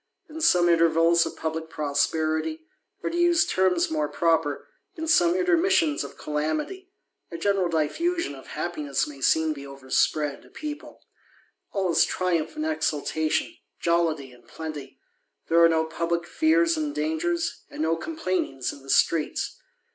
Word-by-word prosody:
In 320 +1 -8
some 180 - +4
intervals 165 0 +4
of - - -7
publick 160 0 -4
prosperity, 155 - -1 0.4
or - - -1
to - - -4
use 345 -1 +4
terms 185 -3 +1
more 150 -2 0
proper, 160 -1 0 0.3
in 320 -1 -5
some 340 +2 +4
intermissions 360 -3 +2
of - - -10
calamity, 155 - -3 0.4
a - - -6
SCQeral 195 0 +1
diffusion 325 - 0
of 135 -1 -12
happiness 150 -5 -2
may 140 -2 -11
seem 160 +3 +3
to 140 -2 -9
overspread 140 +2 -1
a - - -18
people; 300 -1 -8 0.7
all 190 -3 0
is - - +5
triumph 165 -3 -1
and 155 - -3
exultation, 155 0 -1 0.3
jollity 160 -5 0
and 125 - -19
plenty; 150 -4 -8 0.5
^ere 170 0 +7
are - - +6
no 160 -1 +2
publick 170 +1 -2
fears 330 - +2
and 305 -1 -3
dangers, 335 +2 -1
and - - -4
"no 160 +1 +2
com 315 - -6
pUinings 180 - -2
in 140 - -13
the 135 - -14
streets." 160 +1 +1
165 Hz, 150 wpm, -25 LUFS, -, 0.7 s, ^ere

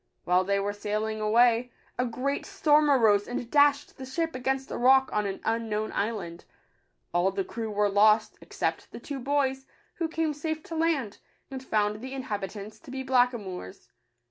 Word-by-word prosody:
While 180 +1 +3
they 200 +1 +1
were 200 +1 -2
sailing 215 +1 -3
away, 235 +3 +3 0.3
a 250 - +1
great 265 +4 -2
storm 305 -6 +3
arose, 220 -7 +4
and 245 -1 -5
dashed 290 -1 +3
the 260 - -6
ship 325 +4 -2
against 265 +1 -2
a - - -3
rock 265 +2 +5
on 210 -1 0
an 195 - -4
unknown 220 -1 -1
island. 200 -6 -3 0.7
All 175 +2 +3
the 390 - -2
crew 230 -12 -5
were 210 0 +1
lost, 210 +2 +4
except - - -3
the - - -8
two 275 +3 -6
boys, 270 0 -1 0.3
who 335 - -1
came 320 -1 -1
safe 315 +1 -4
to 330 - -7
land, 315 -10 0 0.3
and 265 -1 -6
found 210 -3 0
the 260 +2 -6
inhabitants 210 -4 -5
to 310 - -15
be 265 0 -5
blackamoors. 240 - -1
245 Hz, 170 wpm, -27 LUFS, 210-275 Hz, 0.7 s, rock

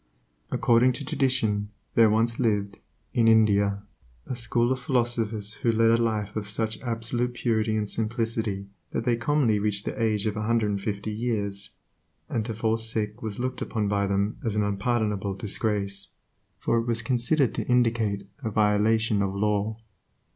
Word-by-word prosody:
According 120 +2 +3
to 140 +3 -6
tradition, 110 -7 0 0.2
there 115 -1 +6
once 115 +2 +1
lived, 105 -4 0 0.3
in 115 -2 +3
India, 100 -3 +4 0.4
a - - -4
school 120 +1 +1
of 130 - 0
philosophers 115 -4 0
who 115 - +3
led 115 0 +4
a 115 0 +3
life 105 -3 -1
of 105 -1 -3
such 110 +1 -1
absolute 120 +1 -2
purity 110 -3 0
and 105 -1 -1
simplicity 110 -3 -2 0.3
that 115 - -2
they 120 -2 +3
commonly 120 -3 +2
reached 100 -1 +1
the - - -4
age 110 -2 +1
of 105 -1 -1
one 105 0 -2
hundred 115 -3 +2
and 100 -1 -2
fifty 100 +1 -3
years, 105 -3 -2 0.6
and 115 - -1
to 115 - -4
fall 110 +1 +1
sick 110 -2 -1
was 110 -3 -4
looked 130 +1 -3
upon 110 -2 -1
by 100 0 +1
them 100 +2 0
as 110 -3 -1
an 105 - +2
unpardonable 105 -1 -1
disgrace, 100 -1 -2 0.5
for 115 - +1
it 115 - -3
was 120 0 0
considered 125 +3 +2
to - - -3
indicate 115 -5 +1 0.2
a 110 - -1
violation 105 0 +2
of 100 -1 -1
law. 105 +1 0
110 Hz, 170 wpm, -26 LUFS, 105-115 Hz, 0.6 s, there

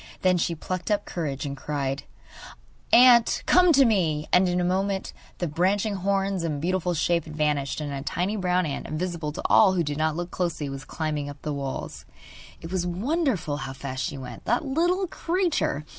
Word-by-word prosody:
Then 185 -1 +3
she 170 0 0
plucked 185 +4 -4
up 205 -1 +1
courage 145 -5 -4
and 140 -1 -4
cried: 140 -1 -3 0.9
'Ant, 240 -1 +6
come 360 -1 +5
to 275 -1 +6
me!' 165 -9 +1
And 180 0 +5
in 180 0 0
a - - +1
moment 190 +2 -1 0.2
the 175 - -2
branching 195 +7 +1
horns 195 0 0
and 155 -3 -2
beautiful 180 +2 0
shape 170 +1 +1
had 155 -1 -9
vanished, 150 -3 0
and 145 -2 -4
a 135 - -4
tiny 180 +8 -2
brown 180 -2 +1
ant, 140 -3 -4
invisible 165 -1 -3
to - - -6
all 195 -3 +6
who 175 -2 +1
did 145 -1 -3
not 155 0 +1
look 175 +1 -4
closely, 170 -5 -2
was 135 +1 -7
climbing 150 -3 -3
up 145 0 -11
the 150 - -2
walls. 140 -2 -5 0.6
It 165 - -8
was 185 -2 0
wonderful 195 - -1
how 135 -2 -5
fast 130 -1 -5
she - - -3
went, 130 - -9
that 240 +6 +1
little 350 +7 +1
creature! 340 - -1
175 Hz, 190 wpm, -25 LUFS, 150-195 Hz, 0.9 s, Ant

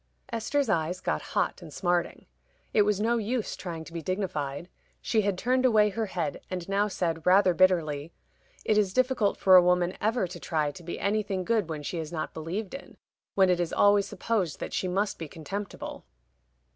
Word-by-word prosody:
Esther's 275 +5 0
eyes 175 -2 0
got 75 - -1
hot - - -1
and 155 - -10
smarting. 175 +2 -1 0.5
It 215 - +5
was 205 -1 +2
no 230 +3 +2
use 230 +1 -2
trying 165 -3 -6
to 165 - -13
be 165 - -4
dignified. 170 -5 -3 0.3
She 220 - +1
had 200 -2 0
turned 255 +5 +1
away 215 -4 +4
her 220 +2 -2
head, 170 -6 -3
and 180 -2 -4
now 200 +1 +1
said, 165 -5 -2
rather 185 +1 +5
bitterly, 165 -5 +2 0.5
"It 215 -1 +3
is 195 -3 0
difficult 255 -5 +2
for 190 -1 +6
a 180 - +10
woman 180 0 +2
ever 220 0 +1
to 175 0 -8
try 155 -4 -1
to 175 - -12
be 170 0 -6
anything 200 -2 0
good 215 -3 0
when 155 -2 -4
she 170 +3 -3
is 160 0 -5
not 160 -2 -4
believed 180 +6 -4
in 275 - -9 0.4
when 190 -2 +5
it 180 - +1
is 175 -2 -1
always 205 -1 +4
supposed 205 -9 -2
that - - -5
she 185 - -1
must 195 +3 -1
be 165 - -5
contemptible." 195 +7 -6
185 Hz, 195 wpm, -28 LUFS, 170-210 Hz, 0.5 s, a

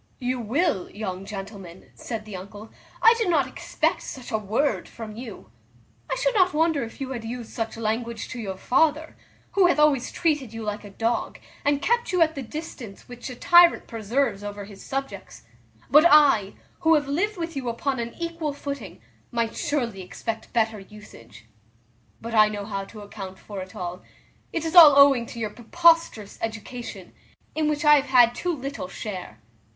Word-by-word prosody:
"You 255 -1 -2
will, 240 - 0
young 195 -2 -6
gentleman;" 195 -3 -9
said 225 -2 -6
the 210 -2 -8
uncle; 205 +4 -10 0.3
"I 455 - +9
did 445 -5 +1
not 300 -6 +3
expect 260 - -2
such 260 -2 -8
a 220 - +1
word 220 +8 -1
from 220 -2 -9
you. 240 +1 -9 0.6
I - - 0
should - - 0
not 370 -6 +3
wonder 320 -2 +2
if 230 +3 -7
you 265 -1 -4
had 240 -3 -5
used 235 0 -6
such 225 -1 -4
language 230 +1 -3
to 255 - -6
your 195 -4 -5
father, 310 +8 +1 0.4
who 385 -3 +4
hath 350 - +2
always 300 -4 +3
treated 295 -9 -1
you 225 0 -6
like 210 0 -4
a 205 - -10
dog, 225 +4 -2 0.3
and 285 0 +1
kept 475 -1 +1
you 365 - +1
at 320 0 -1
the 280 - -5
distance 255 -6 -8
which 245 +1 -8
a 250 - -7
tyrant 345 +6 +6
preserves 225 -1 -1
over 205 0 -6
his 200 -1 -13
subjects; 270 0 -6 0.5
but 305 +3 +8
I, 280 - +5 0.3
who 325 -2 +4
have 290 -2 0
lived 380 +9 -1
with 330 -2 -4
you 260 -3 -3
upon 260 +3 -2
an 235 0 -5
equal 335 -3 -3
footing, 280 0 -7 0.3
might 230 -2 -2
surely 240 -9 -2
expect 220 +4 -6
better 225 -2 +1
usage: 120 - -14 0.7
but 230 0 -7
I 215 -1 +6
know 205 -1 -5
how 195 -2 -4
to 215 +1 -12
account 195 -2 -9
for 200 -1 -8
it 185 0 -10
all: 180 0 -5 0.5
it 330 -1 -3
is 325 - -3
all 320 -6 +10
owing 275 -4 +6
to - - -10
your 220 -2 -3
preposterous 325 - +2
education, 225 +2 -6 0.4
in 310 -1 0
which 300 0 -1
I 295 0 +8
have 280 - 0
had 245 -2 +5
too 355 +8 -2
little 275 -7 -5
share. 185 - -7
240 Hz, 185 wpm, -25 LUFS, 210-295 Hz, 0.7 s, all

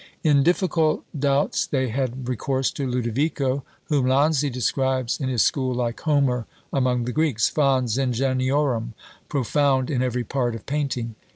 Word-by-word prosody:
In 145 -3 +4
difficult 165 -1 +1
doubts 140 0 +1
they 130 -3 0
had 130 +1 -3
recourse 130 +2 -1
to 140 - -3
Lodovico, 130 +3 -1 0.2
whom 140 -4 +1
Lanzi 145 +2 +3
describes 130 0 0
in 135 -3 -2
his 125 -4 +2
school 130 -3 0
like 120 -1 -2
Homer 140 -6 +1 0.3
among 125 -3 +1
the 125 - -2
Greeks, 150 -6 +1
fons 130 -5 +1
ingeniorum, 130 -2 0 0.3
profound 140 -1 +1
in 130 -3 0
every 125 -1 -1
part 120 -2 -1
of 115 - -9
painting. 135 -5 -2
130 Hz, 145 wpm, -23 LUFS, 125-140 Hz, 0.3 s, In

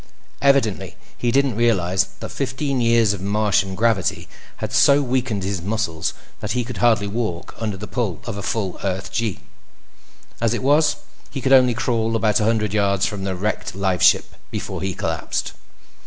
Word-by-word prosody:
Evidently, 140 -7 +2 0.2
he 120 - -1
didn't 135 -1 +2
realize 95 -5 +2 0.2
that - - -5
fifteen 135 0 -2
years 115 -3 +4
of 100 - -6
Martian 100 -1 +1
gravity 110 -2 +1 0.3
had - - -5
so 140 0 +6
weakened 125 -6 -1
his 95 -2 -2
muscles 95 -5 -2 0.2
that 105 - -3
he 125 -1 0
could 125 +1 -7
hardly 115 -4 +3
walk 100 -5 -3
under 110 -3 -3
the 105 - -6
pull 105 -8 -2
of - - -4
a 100 - -5
full 100 -3 -2
Earth 95 -1 -3
gee. 115 -4 -2 1.0
As 115 0 +2
it 120 - -4
was, 150 +3 +4 0.3
he 135 - -5
could 135 +1 +2
only 125 -2 +6
crawl 115 -1 0
about 110 -2 +2
a 105 - +1
hundred 110 -2 +1
yards 100 -2 +2
from 100 -2 -3
the 95 -1 -2
wrecked 100 0 -3
lifeship 95 -2 +3 0.2
before - - -5
he 95 -1 -2
collapsed. - - -3
110 Hz, 170 wpm, -21 LUFS, 100-120 Hz, 1.0 s, so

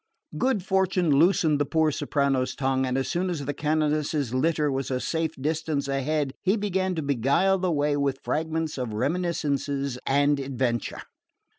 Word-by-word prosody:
Good 255 -7 +1
fortune 190 -3 +1
loosened 155 0 +4
the 145 - +2
poor 160 +1 +2
soprano's 140 -3 0
tongue, 130 -1 0
and 130 +1 -1
as 135 - -1
soon 185 +2 -1
as 155 -6 -3
the 145 - -2
canonesses' 150 -3 0
litter 150 +2 +1
was 135 0 -2
a 130 -1 -1
safe 160 +3 -2
distance 155 0 -1
ahead 135 +1 -1
he 195 +4 +2
began 190 -3 -1
to 160 - -2
beguile 140 +9 +2
the 180 -1 0
way 145 -1 +1
with 140 -2 0
fragments 160 -1 -2
of 120 -4 -3
reminiscence 140 -1 -1
and 145 +1 +3
adventure. 130 -3 -2
145 Hz, 160 wpm, -26 LUFS, 135-165 Hz, -, loosened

